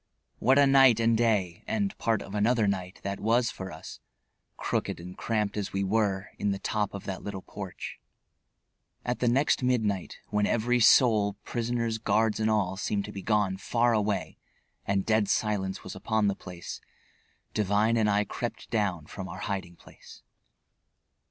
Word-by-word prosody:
What 130 Hz, +3 st, +4 dB
a 140 Hz, -, +7 dB
night 135 Hz, -4 st, +6 dB
and 115 Hz, 0 st, +3 dB
day 105 Hz, -7 st, +1 dB
and 205 Hz, -3 st, -1 dB
part 115 Hz, -2 st, +1 dB
of 100 Hz, -, -10 dB
another 110 Hz, +2 st, +2 dB
night 95 Hz, -2 st, -2 dB
that 100 Hz, 0 st, -3 dB
was 115 Hz, +2 st, +2 dB
for 95 Hz, 0 st, -7 dB
us, 80 Hz, -, -10 dB, 0.6 s
crooked -, -, -2 dB
and 90 Hz, +2 st, -9 dB
cramped 105 Hz, -3 st, -1 dB
as 100 Hz, -, -3 dB
we 100 Hz, 0 st, 0 dB
were, 100 Hz, -2 st, 0 dB
in 105 Hz, -, 0 dB
the 100 Hz, -, 0 dB
top 105 Hz, 0 st, -2 dB
of 100 Hz, -, -6 dB
that 95 Hz, -1 st, -5 dB
little 100 Hz, -2 st, -6 dB
porch. 100 Hz, -3 st, -7 dB, 1.1 s
At 120 Hz, -, -1 dB
the 125 Hz, -, +1 dB
next 135 Hz, +5 st, +3 dB
midnight, 110 Hz, -7 st, 0 dB
when 105 Hz, -1 st, +1 dB
every 120 Hz, +2 st, +2 dB
soul, 110 Hz, -3 st, +5 dB
prisoners, 115 Hz, -1 st, -2 dB
guards 110 Hz, -1 st, +1 dB
and 110 Hz, 0 st, +1 dB
all, 95 Hz, -3 st, +1 dB
seemed 100 Hz, 0 st, -1 dB
to -, -, -7 dB
be 100 Hz, -, -6 dB
gone 105 Hz, -2 st, +1 dB
far 120 Hz, +4 st, +1 dB
away 105 Hz, -2 st, -1 dB, 0.5 s
and 100 Hz, -1 st, +1 dB
dead 110 Hz, -2 st, +2 dB
silence 100 Hz, -3 st, 0 dB
was -, -, -7 dB
upon 110 Hz, -1 st, 0 dB
the 100 Hz, -1 st, +1 dB
place, 90 Hz, -2 st, -8 dB, 0.7 s
Devine 105 Hz, +2 st, +2 dB
and 110 Hz, -2 st, +2 dB
I 105 Hz, 0 st, +3 dB
crept 120 Hz, +3 st, -5 dB
down 95 Hz, -8 st, 0 dB
from 95 Hz, +4 st, -7 dB
our -, -, -7 dB
hiding 95 Hz, -3 st, -4 dB
place. -, -, -16 dB
105 Hz, 170 wpm, -28 LUFS, 95-115 Hz, 1.1 s, a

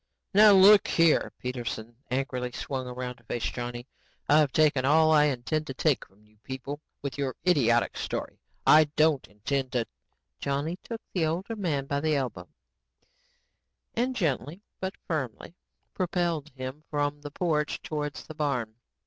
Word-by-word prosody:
"Now, 210 Hz, +1 st, +8 dB
look 200 Hz, +1 st, +8 dB
here," 165 Hz, -2 st, +3 dB
Peterson 120 Hz, -2 st, -5 dB
angrily 125 Hz, -1 st, -2 dB
swung 130 Hz, -1 st, -4 dB
around 125 Hz, 0 st, -5 dB
to -, -, -23 dB
face 120 Hz, -, -3 dB
Johnny. 120 Hz, 0 st, -5 dB, 0.4 s
"I've 150 Hz, -1 st, +5 dB
taken 145 Hz, -3 st, +3 dB
all 155 Hz, +3 st, +5 dB
I 150 Hz, -1 st, +6 dB
intend 150 Hz, +3 st, -1 dB
to 135 Hz, -, -5 dB
take 140 Hz, -4 st, +1 dB
from 100 Hz, +2 st, -27 dB
you 105 Hz, 0 st, -28 dB
people 135 Hz, +3 st, -6 dB, 0.2 s
with 140 Hz, 0 st, -4 dB
your 135 Hz, -3 st, -1 dB
idiotic 120 Hz, -9 st, +3 dB
story. -, -, -4 dB, 0.3 s
I 155 Hz, 0 st, +8 dB
don't 155 Hz, -3 st, +3 dB
intend 130 Hz, +6 st, -3 dB
to...." 120 Hz, -2 st, +1 dB, 0.5 s
Johnny 145 Hz, +5 st, -2 dB
took 230 Hz, -1 st, -7 dB
the 165 Hz, -4 st, +1 dB
older 185 Hz, +8 st, -2 dB
man 160 Hz, -10 st, -1 dB
by 140 Hz, +1 st, -1 dB
the 155 Hz, +1 st, +1 dB
elbow 115 Hz, -, -3 dB, 1.4 s
and 255 Hz, +2 st, 0 dB
gently 160 Hz, -, -2 dB, 0.2 s
but 190 Hz, +1 st, -4 dB
firmly 140 Hz, -2 st, -4 dB, 0.4 s
propelled 170 Hz, -4 st, -1 dB
him 130 Hz, +2 st, -7 dB
from 145 Hz, 0 st, -1 dB
the 145 Hz, -, -6 dB
porch 150 Hz, -1 st, -1 dB
towards 150 Hz, -2 st, -4 dB
the 155 Hz, -, -9 dB
barn. 140 Hz, -8 st, -1 dB
145 Hz, 150 wpm, -28 LUFS, 125-160 Hz, 1.4 s, Now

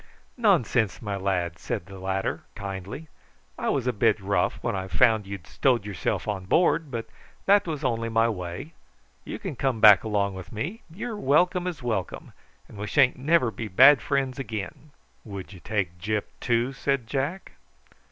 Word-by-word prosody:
"Nonsense, 145 Hz, -, +2 dB
my 105 Hz, -3 st, -4 dB
lad!" 90 Hz, -4 st, -1 dB
said -, -, -4 dB
the 95 Hz, -1 st, -11 dB
latter 95 Hz, +1 st, -2 dB
kindly. 100 Hz, -, -6 dB, 0.5 s
"I -, -, -2 dB
was -, -, 0 dB
a -, -, +1 dB
bit -, -, +2 dB
rough -, -, 0 dB
when -, -, -1 dB
I 95 Hz, 0 st, -3 dB
found 110 Hz, +1 st, +3 dB
you'd 100 Hz, -4 st, -7 dB
stowed 125 Hz, -6 st, +1 dB
yourself 100 Hz, -1 st, -2 dB
on 100 Hz, -3 st, -3 dB
board, 165 Hz, -, +2 dB
but 115 Hz, -3 st, -4 dB, 0.4 s
that 200 Hz, -1 st, +4 dB
was 155 Hz, -2 st, -4 dB
only 115 Hz, -3 st, 0 dB
my 115 Hz, 0 st, +3 dB
way. 95 Hz, -, -5 dB, 0.5 s
You -, -, -5 dB
come 130 Hz, -3 st, -2 dB
back 105 Hz, -2 st, +8 dB
along 100 Hz, -3 st, 0 dB
with 95 Hz, -1 st, -9 dB
me: 170 Hz, -, -4 dB
you're 210 Hz, +7 st, -5 dB
welcome 180 Hz, +3 st, +2 dB
as 165 Hz, -7 st, -5 dB
welcome, 110 Hz, -6 st, -3 dB, 0.3 s
and 100 Hz, -, -12 dB
we 105 Hz, -, -4 dB
sha'n't 130 Hz, +1 st, +3 dB
never 140 Hz, -3 st, +3 dB
be 110 Hz, 0 st, -5 dB
bad 130 Hz, +7 st, +7 dB
friends 135 Hz, -1 st, -1 dB
again." 115 Hz, +4 st, -6 dB, 0.3 s
"Would 100 Hz, -2 st, -8 dB
you 90 Hz, -, -11 dB
take 90 Hz, -2 st, -2 dB
Gyp 105 Hz, +3 st, -1 dB, 0.2 s
too?" 120 Hz, +2 st, 0 dB
said 135 Hz, -1 st, -1 dB
Jack. 140 Hz, +10 st, -3 dB
115 Hz, 170 wpm, -26 LUFS, 100-140 Hz, 0.5 s, back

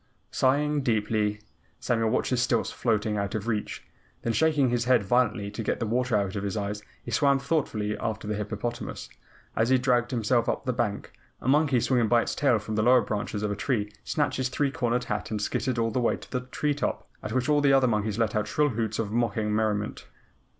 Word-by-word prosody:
Sighing 145 Hz, +3 st, +2 dB
deeply, 105 Hz, -3 st, 0 dB, 0.4 s
Samuel 115 Hz, -2 st, +1 dB
watched -, -, 0 dB
his 125 Hz, -1 st, +2 dB
stilts 120 Hz, -3 st, +1 dB
floating 110 Hz, -2 st, 0 dB
out 100 Hz, 0 st, -2 dB
of 110 Hz, +1 st, -3 dB
reach, 110 Hz, -3 st, -2 dB, 0.4 s
then 115 Hz, -, 0 dB
shaking 145 Hz, 0 st, +3 dB
his 120 Hz, -1 st, 0 dB
head 125 Hz, -4 st, +4 dB
violently 105 Hz, -1 st, +1 dB
to 105 Hz, -, -5 dB
get -, -, -1 dB
the 115 Hz, -, -1 dB
water 120 Hz, +1 st, 0 dB
out 100 Hz, -1 st, 0 dB
of 100 Hz, -, -2 dB
his 100 Hz, +1 st, -3 dB
eyes, 105 Hz, 0 st, -3 dB, 0.2 s
he -, -, -7 dB
swam 140 Hz, -2 st, +3 dB
thoughtfully 135 Hz, -8 st, -1 dB
after 110 Hz, -1 st, -3 dB
the 105 Hz, -, -1 dB
hippopotamus. 105 Hz, +3 st, -4 dB, 0.5 s
As 115 Hz, +2 st, +2 dB
he 130 Hz, -, +5 dB
dragged 125 Hz, -1 st, +2 dB
himself 120 Hz, -1 st, +1 dB
up -, -, -1 dB
on -, -, -28 dB
the 125 Hz, -, 0 dB
bank, 105 Hz, -3 st, -2 dB, 0.3 s
a -, -, -7 dB
monkey 140 Hz, -2 st, +4 dB
swinging 120 Hz, -1 st, +2 dB
by 120 Hz, +1 st, +4 dB
its -, -, -3 dB
tail 135 Hz, -5 st, +3 dB
from 110 Hz, +1 st, -5 dB
the 110 Hz, -, +1 dB
lower 125 Hz, +3 st, +5 dB
branches 105 Hz, -1 st, -3 dB
of 105 Hz, -, 0 dB
a -, -, -1 dB
tree 105 Hz, -1 st, -1 dB
snatched 150 Hz, -3 st, 0 dB
his 130 Hz, -1 st, 0 dB
three 140 Hz, +2 st, 0 dB
cornered 125 Hz, -1 st, 0 dB
hat 105 Hz, 0 st, -3 dB
and 110 Hz, -, -2 dB
scittered 125 Hz, +4 st, -1 dB
all 115 Hz, -1 st, +1 dB
the 125 Hz, -, 0 dB
way 120 Hz, -, +1 dB
to -, -, -14 dB
the 125 Hz, -, -1 dB
tree 150 Hz, +2 st, 0 dB
top, 145 Hz, -, -3 dB
at 105 Hz, -, -5 dB
which 130 Hz, +2 st, 0 dB
all 150 Hz, -1 st, +3 dB
the 140 Hz, -1 st, +4 dB
other 135 Hz, -1 st, +5 dB
monkeys 105 Hz, -2 st, 0 dB
let 115 Hz, -2 st, 0 dB
out 105 Hz, 0 st, 0 dB
shrill 150 Hz, +6 st, +2 dB
hoots 110 Hz, -3 st, -2 dB
of 105 Hz, -2 st, -2 dB
mocking 110 Hz, -2 st, 0 dB
merriment. 105 Hz, -1 st, -1 dB
115 Hz, 225 wpm, -27 LUFS, 105-130 Hz, 0.5 s, he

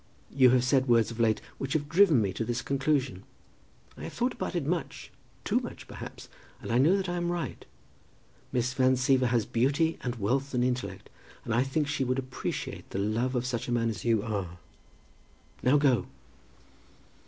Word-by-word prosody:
You 130 Hz, -2 st, +6 dB
have 125 Hz, 0 st, +4 dB
said 130 Hz, +1 st, +2 dB
words 115 Hz, -1 st, +4 dB
of 115 Hz, -, -8 dB
late 110 Hz, -2 st, +2 dB, 0.2 s
which 135 Hz, -1 st, -3 dB
have 145 Hz, -2 st, 0 dB
driven 165 Hz, -, +5 dB
me 95 Hz, -2 st, -1 dB
to 115 Hz, -, -2 dB
this 120 Hz, +1 st, -2 dB
conclusion. 135 Hz, -6 st, 0 dB, 0.7 s
I -, -, -8 dB
have -, -, -7 dB
thought 245 Hz, +1 st, 0 dB
about -, -, -4 dB
it 170 Hz, -5 st, -1 dB
much, 170 Hz, +2 st, -3 dB, 0.3 s
too -, -, +2 dB
much, -, -, -8 dB
perhaps, -, -, -9 dB, 0.3 s
and -, -, -6 dB
I 120 Hz, -, +3 dB
know 165 Hz, +9 st, +5 dB
that 190 Hz, -1 st, -2 dB
I 175 Hz, 0 st, -2 dB
am 175 Hz, 0 st, -1 dB
right. 170 Hz, -8 st, -4 dB, 0.9 s
Miss 125 Hz, +1 st, 0 dB
Van 130 Hz, -1 st, +3 dB
Siever 130 Hz, 0 st, +3 dB
has 120 Hz, -3 st, +1 dB
beauty 145 Hz, +9 st, +1 dB
and 120 Hz, -1 st, -3 dB
wealth 130 Hz, +6 st, -1 dB
and 125 Hz, -, +2 dB
intellect, 125 Hz, -7 st, -2 dB, 0.4 s
and 115 Hz, -, -1 dB
I 120 Hz, -, +3 dB
think 135 Hz, +3 st, 0 dB
that 145 Hz, -, -3 dB
she 145 Hz, -, 0 dB
would 130 Hz, 0 st, 0 dB
appreciate 130 Hz, -1 st, -5 dB
the -, -, -5 dB
love 110 Hz, +6 st, 0 dB
of 125 Hz, 0 st, 0 dB
such 125 Hz, -2 st, -2 dB
a -, -, -3 dB
man 115 Hz, -1 st, +1 dB
as 100 Hz, -4 st, -7 dB
you 115 Hz, -3 st, +2 dB
are. 100 Hz, -6 st, -3 dB, 1.0 s
Now 130 Hz, +4 st, +4 dB
go." 140 Hz, -4 st, +2 dB
130 Hz, 195 wpm, -29 LUFS, 115-140 Hz, 1.0 s, You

